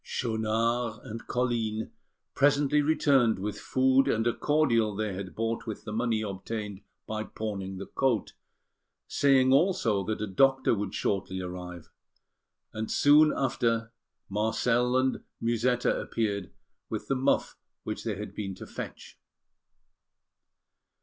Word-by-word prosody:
Schaunard 115 0 -1
and 115 +1 -8
Colline 115 -3 -1 0.4
presently 145 +1 +3
returned 140 -6 +3
with 100 +2 -4
food 130 +1 +3
and 115 +1 +1
a 120 - +2
cordial 115 -9 +2
they 105 -1 -2
had 95 0 -6
bought 115 +1 -2
with 110 - -5
the 105 - -6
money 115 -1 0
obtained 105 0 -5 0.2
by 110 0 -3
pawning 100 -4 -5
the 100 - -6
coat, 125 -6 0 0.7
saying 135 -2 +4
also 135 - +2
that 110 +1 -2
a 105 - -1
doctor 135 +7 +3
would 100 -3 -3
shortly 95 -1 -1
arrive; 90 -2 -7 0.8
and 110 0 -4
soon 150 +2 +6
after 115 -3 0 0.3
Marcel 115 +4 +1
and 130 0 +1 0.2
Musetta 120 +2 +1
appeared 100 -4 -2 0.4
with - - -4
the - - +1
muff 135 +2 +1 0.3
they 110 0 -3
had 105 +2 -7
been 95 -2 -4
to - - -9
fetch. - - -8
115 Hz, 125 wpm, -28 LUFS, 105-130 Hz, 0.8 s, soon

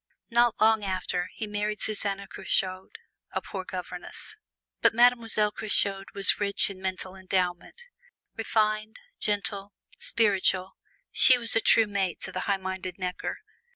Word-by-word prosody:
Not 235 -1 +3
long 220 -1 +4
after, 185 -2 -2
he 220 - -4
married 210 0 -3
Susanna 200 -2 +1
Curchod, 190 - -2 0.4
a - - 0
poor 190 -2 -7
governess. 180 -1 -7 0.5
But - - +4
Mademoiselle 230 -3 +4
Curchod 200 -2 0
was 200 -1 +3
rich 200 0 +1
in 190 -1 -11
mental 185 0 -3
endowment: 185 - -2 0.5
refined, 215 0 0 0.2
gentle, 205 -1 -2 0.3
spiritual, 195 -4 +2 0.4
she 255 - +6
was 230 -2 +2
a 225 - +3
true 225 0 +5
mate 195 -4 -2
to - - -2
the 185 - -4
high 200 - +3
minded 190 -1 -5
Necker. 180 -1 -4
200 Hz, 135 wpm, -27 LUFS, 185-215 Hz, 0.5 s, she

